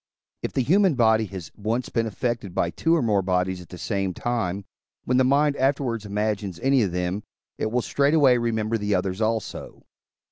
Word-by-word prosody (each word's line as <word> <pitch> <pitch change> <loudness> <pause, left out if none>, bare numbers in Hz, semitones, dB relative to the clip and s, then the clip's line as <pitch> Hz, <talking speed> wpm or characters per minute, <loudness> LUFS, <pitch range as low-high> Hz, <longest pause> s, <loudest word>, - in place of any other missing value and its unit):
If - - -4
the 130 - +1
human 185 +3 +3
body 110 -2 +3
has 95 -4 -8
once 115 +4 -2
been 115 -1 0
affected 115 -3 -3
by 85 - +1
two 165 - +1
or 160 - +1
more 105 -4 +2
bodies 90 0 -1
at 90 - -14
the 90 - -9
same 95 -2 -2
time, 100 -5 -2 0.4
when 125 - +1
the 130 - +5
mind 140 +2 +3
afterwards 130 -5 0
imagines 105 -3 -2
any 135 -1 +3
of 100 -5 0
them, 90 +3 -2 0.4
it 110 - 0
will 120 +1 0
straightway 140 -3 +3
remember 115 -1 -1
the 105 -1 0
others 95 +2 -2
also. 110 0 -3
110 Hz, 185 wpm, -24 LUFS, 95-125 Hz, 0.4 s, the